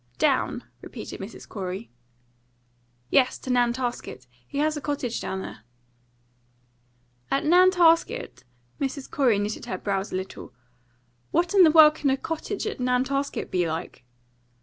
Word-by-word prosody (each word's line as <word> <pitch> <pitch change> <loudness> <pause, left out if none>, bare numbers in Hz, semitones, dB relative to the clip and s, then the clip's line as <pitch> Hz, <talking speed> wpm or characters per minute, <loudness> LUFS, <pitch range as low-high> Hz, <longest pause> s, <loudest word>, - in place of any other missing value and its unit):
"Down?" - - +1 0.2
repeated - - -8
Mrs. 195 +4 -9
Corey. 190 +1 -6 1.2
"Yes, 255 -2 +3
to 260 - -5
Nantasket. 240 - -1 0.2
He - - -7
has 305 +1 +1
a 295 - -5
cottage 275 -5 -3
down 190 0 -4
there." - - -8 1.7
"At 275 - 0
Nantasket?" 350 - +3 0.4
Mrs. 275 0 -3
Corey 250 -7 +3
knitted 205 +1 -3
her 185 - -4
brows 195 +1 -2
a - - -3
little. 185 -8 -6 0.7
"What 345 +2 +1
in 395 - +6
the 335 - +8
world 305 -1 +8
can 300 -2 -1
a 265 - +2
cottage 325 +7 -4
at 430 - -4
Nantasket 260 +3 -1
be 180 -2 +1
like?" 160 -4 -5
260 Hz, 135 wpm, -25 LUFS, 205-305 Hz, 1.7 s, the